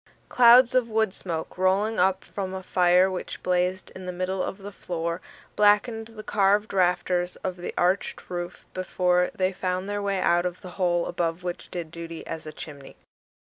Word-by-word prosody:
Clouds 245 +1 +7
of 250 -2 +2
wood 220 -3 +1
smoke, 170 -2 -5
rolling 195 +4 +2
up 190 0 +2
from 190 -2 -5
a 190 - -6
fire 180 +1 +4
which 185 - -6
blazed 180 +1 0
in 185 -1 -8
the - - -2
middle 185 +1 -2
of 190 - -3
the 200 0 -9
floor, 170 -2 -4 0.3
blackened 210 +2 +3
the 225 -2 -10
carved 205 +1 +2
rafters 180 -1 +1
of 185 -1 -2
the 175 0 -5
arched 180 +3 0
roof 175 -1 -6
before 180 -1 +1
they 185 0 0
found 185 0 -2
their 205 0 -2
way 200 -1 0
out 175 0 +2
of 180 0 -7
the 180 - -9
hole 175 -2 +1
above 170 0 -2
which 175 -1 -5
did 170 -3 -5
duty 170 -1 -7
as 160 -1 -6
a - - -5
chimney. 145 -3 -10
185 Hz, 180 wpm, -26 LUFS, 175-200 Hz, 0.3 s, Clouds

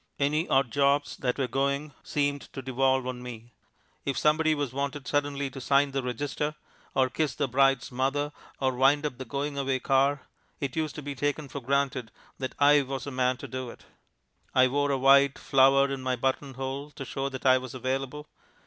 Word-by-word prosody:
Any 150 +4 +1
odd 135 -3 +3
jobs 140 +1 +2
that 125 -2 -1
were 135 -2 0
going 140 +3 -1
seemed 145 -1 -2
to 135 - -6
devolve 130 0 +1
on 125 -1 -4
me. 120 -1 -9 0.5
If 140 - -2
somebody 155 +1 +3
was 145 -4 -3
wanted 140 0 -3
suddenly 145 -1 -1
to 135 - -8
sign 140 +2 +3
the 135 0 -1
register, 145 +4 -3 0.4
or 130 -1 +4
kiss 150 +3 -1
the 140 - 0
bride's 135 0 +2
mother, 135 +4 0 0.3
or 130 -1 +1
wind 140 +4 +3
up 135 -4 -4
the 130 - -5
going 140 +3 -3
away 135 -1 0
car, 135 +1 +2 0.4
it 135 -3 -3
used 155 -2 -2
to 150 - -7
be 145 0 -4
taken 145 +2 -2
for 140 - -5
granted 135 -2 0 0.3
that 130 -1 -4
I 145 0 +6
was 135 -1 -4
the 140 - -5
man 130 -1 +1
to - - -8
do 130 -1 -5
it. - - -13 0.7
I 130 0 +6
wore 145 +2 +1
a 140 - +1
white 140 +1 +5
flower 135 +1 +4
in 135 -1 -3
my 130 0 0
button 135 +2 -2
hole 135 +2 -4
to 135 -2 -8
show 135 +2 -3
that 130 0 -8
I 130 0 +6
was 130 -1 -8
available. 135 +3 -3
135 Hz, 200 wpm, -28 LUFS, 130-145 Hz, 0.7 s, I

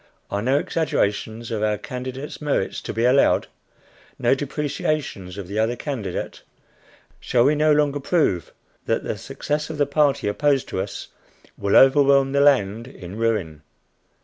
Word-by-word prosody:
are 100 - -1
no 130 +5 +2
exaggerations 115 -7 -1
of 110 -2 -2
our 105 -1 +1
candidate's 130 +7 -7
merits 145 -10 -1
to - - -5
be 115 +1 0
allowed? 130 +3 +4 0.7
no 120 - +3
depreciations 145 - -3
of 100 -3 -6
the 100 +3 -3
other 115 +2 +1
candidate? 120 - -5 0.8
Shall 120 -2 +2
we 140 +4 +4
no 155 +1 +3
longer 145 -1 +2
prove 135 - 0 0.4
that - - 0
the - - -3
success 150 +1 -4
of 155 - -5
the 145 - +3
party 140 -3 +1
opposed 140 +5 +1
to 95 - -2
us - - -6 0.5
will 100 0 0
overwhelm 135 0 +5
the 140 0 +2
land 115 -5 +3
in 95 -8 -10
ruin? 105 -10 -1
130 Hz, 150 wpm, -22 LUFS, 105-145 Hz, 0.8 s, overwhelm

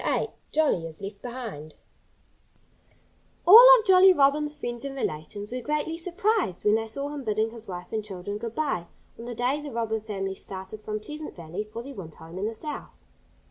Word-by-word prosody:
VIII - - 0 0.2
JOLLY 285 - +2
IS 160 -1 -12
LEFT 200 +1 -8
BEHIND 225 - -7 1.7
All 455 +7 +11
of 440 - -5
Jolly 380 0 +8
Robin's 295 0 +2
friends 240 -5 -5
and 275 -1 -5
relations 205 - -4
were 250 0 -3
greatly 300 +3 -1
surprised 365 - -1
when 210 - +5
they 225 0 +1
saw 280 +6 -4
him 290 -2 -6
bidding 220 0 0
his 230 -1 -10
wife 180 -1 -7
and 215 -1 -1
children 205 0 -5
good 230 0 -6
by, 275 - -1 0.3
on 230 - -7
the 240 -1 -5
day 255 +5 0
the 295 - -6
Robin 225 -2 -2
family 195 -3 -4
started 190 +2 -9
from 215 0 -4
Pleasant 300 +7 -8
Valley 170 +4 -5
for 230 +2 -6
their 275 +2 -8
winter 165 - -9
home 165 +3 -9
in 205 - -1
the 225 - -5
South. 300 +6 -8
225 Hz, 190 wpm, -26 LUFS, 200-290 Hz, 1.7 s, All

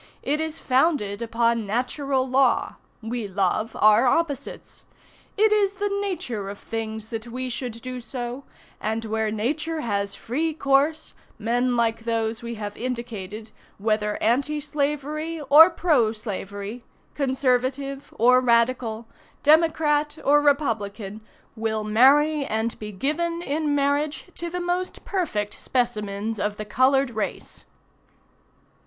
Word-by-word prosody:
It 300 +2 0
is 320 0 -3
founded 255 -8 +1
upon 230 -1 +1
natural 260 +4 -1
law. 260 -1 +2 0.3
We 225 -1 -3
love 200 +3 -1
our 215 +4 +6
opposites. 285 -1 -2 0.5
It 430 +1 +4
is 405 -2 +2
the 405 0 -1
nature 245 - -3
of 200 - -7
things 220 -1 -5
that 225 0 -5
we 255 +2 -4
should 235 -2 -5
do 255 -1 -5
so, 245 +2 -5 0.4
and 220 +1 -2
where 220 0 -1
Nature 300 +9 -2
has 200 -4 -2
free 310 +6 -2
course, 290 +2 +1 0.2
men 245 +3 +1
like 230 -1 +1
those 225 0 -2
we 235 0 -5
have 205 -1 -6
indicated, 225 -4 -5 0.3
whether 210 0 0
Anti 275 +7 +1
Slavery 300 +2 -2
or 320 +4 +10
Pro 290 -11 +2
Slavery, 205 +1 -6 0.3
Conservative 270 0 -1
or 250 +2 +5
Radical, 235 -2 +1 0.4
Democrat 305 -1 +3
or 290 +1 +5
Republican, 220 -8 0 0.3
will 220 -1 -2
marry 280 +8 +4
and 225 -2 -2
be 210 -1 -6
given 335 - -1
in 295 -1 0
marriage 285 +2 0
to 340 - -5
the 360 +1 -3
most 355 +1 -3
perfect 250 - -2
specimens 215 -3 -2
of 210 0 -1
the 215 - -5
colored 260 +4 +3
race." 220 -2 -5
250 Hz, 125 wpm, -24 LUFS, 220-295 Hz, 0.5 s, or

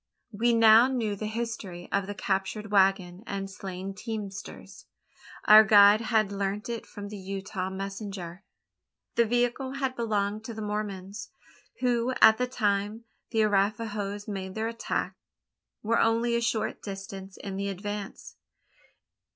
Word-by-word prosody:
We 235 +3 +2
now 225 +1 +7
knew 230 -6 -1
the 215 +2 -4
history 220 -6 -5
of 200 -1 0
the 205 - -5
captured 195 +2 -2
waggon 190 -1 +2
and 195 -1 -4
slain 190 0 -6
teamsters. 200 -2 -7 0.6
Our 215 +1 +10
guide 205 +1 +7
had 220 -3 +1
learnt 200 +2 -3
it 235 -1 -5
from 205 -1 -8
the 210 - -7
Utah 190 -1 -4
messenger. 195 -2 -6 0.7
The 235 -1 +3
vehicle 245 +3 0
had 265 -1 -2
belonged 215 -2 -1
to 230 - -6
the 220 - -6
Mormons; 205 0 -5 0.5
who, 245 0 +1
at 220 0 +7
the 250 - +1
time 210 -2 -1 0.3
the 225 -2 +2
Arapahoes 205 0 -1
made 190 -2 -5
their 220 +1 -1
attack, 230 0 -3 0.7
were 230 +2 +2
only 230 +1 +2
a 235 - +1
short 230 -1 -1
distance 195 -1 -8
in 195 -1 -6
the 200 +1 -2
advance. 205 +1 -6
205 Hz, 140 wpm, -28 LUFS, 195-225 Hz, 0.7 s, Our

